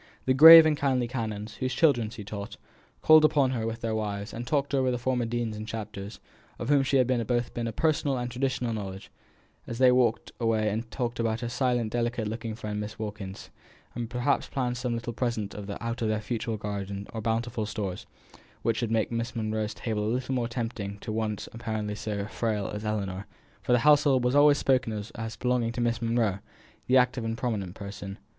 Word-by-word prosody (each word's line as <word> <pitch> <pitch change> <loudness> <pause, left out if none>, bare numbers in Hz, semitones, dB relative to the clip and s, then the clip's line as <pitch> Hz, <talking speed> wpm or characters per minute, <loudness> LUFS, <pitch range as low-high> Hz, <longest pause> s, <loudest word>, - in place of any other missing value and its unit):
The 130 - +3
grave 160 +4 +11
and 155 -1 +3
kindly 130 -4 +1
canons, 110 -3 -4
whose 130 0 -2
children 130 -8 +3
she 110 -1 -8
taught, 100 0 -7 0.5
called 155 0 +8
upon 145 -4 +4
her 115 -3 -2
with 115 +1 -5
their 115 -1 -1
wives, 105 -1 -3
and 120 +1 -6
talked 140 0 0
over 130 -2 +2
the 125 - 0
former 125 0 0
deans 115 -1 -2
and 105 +1 -7
chapters, 110 -2 -6 0.4
of 120 - -5
whom 145 -1 +5
she 135 0 +2
had 130 - +4 0.2
both 120 -1 -1
a 115 -1 -2
personal 150 +1 +1
and 120 0 -3
traditional 125 -1 -1
knowledge, 95 -3 -6 0.6
and - - -7
as - - -6
they 130 0 +6
walked 125 -3 +2
away 110 -2 +1
and 115 +3 -3
talked 120 0 -3
about 115 0 0
her 120 - -3
silent 120 -3 0
delicate 120 -1 -1
looking 115 0 -4
friend 105 -2 -4
Miss 105 +1 -6
Wilkins, 105 -3 -7 0.4
and 120 -1 -4
perhaps 125 +3 0
planned 125 -3 -1
some 125 -1 -2
little 115 0 -4
present 115 -4 -2
out 105 +4 -5
of 115 - +1
their 110 0 0
fruitful 110 0 -3
garden 100 -1 -5
or 110 - -4
bounteous 115 0 -1
stores, 100 -5 -4 0.6
which 115 -1 +1
should 115 - -1
make 110 0 0
Miss 115 0 -3
Monro's 110 -1 -2
table 110 -3 -2
a 115 - +1
little 130 +1 -2
more 120 -2 0
tempting 115 -4 -4
to 110 - -5
one 110 -1 -1 0.2
apparently 110 -2 -3
so 105 -1 -3
frail 110 -2 -2
as 105 +1 -5
Ellinor, 100 -2 -3 0.3
for - - -2
the 125 - +6
household 145 -4 +5
was 125 +1 +2
always 145 0 +6
spoken 130 -5 +1
of 105 +1 -6
as 115 -1 -5
belonging 125 -2 0
to 120 - -3
Miss 120 -1 0
Monro, 115 -4 +1 0.5
the 130 - +5
active 125 -1 +2
and 115 0 -3
prominent 105 -7 -3
person. 100 -1 -7
115 Hz, 205 wpm, -28 LUFS, 110-125 Hz, 0.6 s, grave